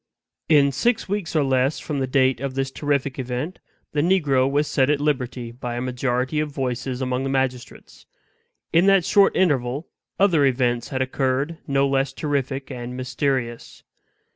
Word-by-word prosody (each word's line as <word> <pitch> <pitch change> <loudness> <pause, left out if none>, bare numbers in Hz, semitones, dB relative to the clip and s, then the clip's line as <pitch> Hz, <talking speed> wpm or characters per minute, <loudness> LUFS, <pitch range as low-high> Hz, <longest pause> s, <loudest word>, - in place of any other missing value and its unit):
In 145 -3 +5
six 230 - 0
weeks 195 -4 -3
or 155 - +3
less 135 +1 +1
from 145 -3 -4
the 130 - -1
date 130 -1 +2
of 135 0 -4
this 135 0 -1
terrific 140 -2 -1
event, 130 +7 -4 0.3
the 150 - 0
negro 145 -7 +2
was 145 +2 +1
set 135 -1 +2
at 150 -1 +2
liberty 125 -5 -2
by 120 0 -5
a - - -2
majority 130 +2 -1
of 155 0 -1
voices 130 -2 -3
among 125 0 -1
the 135 - -2
magistrates. 130 -2 -3 0.7
In 170 +4 +5
that 195 -3 +5
short 200 -1 +4
interval 140 -4 0 0.3
other 180 -7 +4
events 125 -3 +1
had 130 -2 -1
occurred 135 +4 -1
no 140 -1 +2
less 135 0 0
terrific 140 -2 -2
and 125 0 -6
mysterious. 130 -2 -3
135 Hz, 165 wpm, -23 LUFS, 130-150 Hz, 0.7 s, In